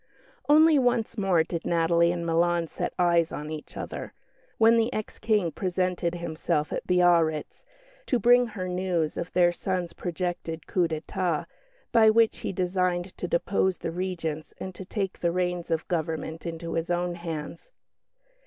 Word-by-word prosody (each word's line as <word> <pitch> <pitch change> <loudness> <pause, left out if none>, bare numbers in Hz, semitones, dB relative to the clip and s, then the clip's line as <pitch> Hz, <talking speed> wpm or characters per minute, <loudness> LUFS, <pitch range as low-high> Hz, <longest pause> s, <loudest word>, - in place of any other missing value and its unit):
Only 310 0 +6
once 240 -3 +1
more 190 -6 +2
did 170 0 -5
Natalie 170 0 +3
and 170 -1 -3
Milan 170 +1 +2
set - - -4
eyes 170 -2 +3
on 150 +1 -5
each 155 -1 -8
other - - -6 0.4
when 225 +1 +6
the 230 +1 +2
ex 215 -4 -5
King 210 -7 +1
presented 180 -1 -1
himself 160 -3 -2
at - - -4
Biarritz, 170 -4 +2 0.4
to 250 - +2
bring 245 +2 +5
her 200 -5 -5
news 180 -3 -1
of 170 - -4
their 175 -1 +4
son's 180 -1 -3
projected 175 -2 -4
coup 180 -2 +1
d'état, 165 +1 -2 0.5
by 225 -2 +6
which 225 0 +3
he - - -3
designed 180 0 -1
to 180 - -2
depose 190 +2 +1
the 165 - -4
Regents 165 -3 -4
and 185 - -6
to 190 - -9
take 195 0 -3
the 170 - +1
reins 180 -1 -1
of 165 -1 -1
government 160 -1 -3
into 165 0 -5
his 165 +1 -2
own 175 0 0
hands. 165 - -6
175 Hz, 160 wpm, -27 LUFS, 165-190 Hz, 0.5 s, Only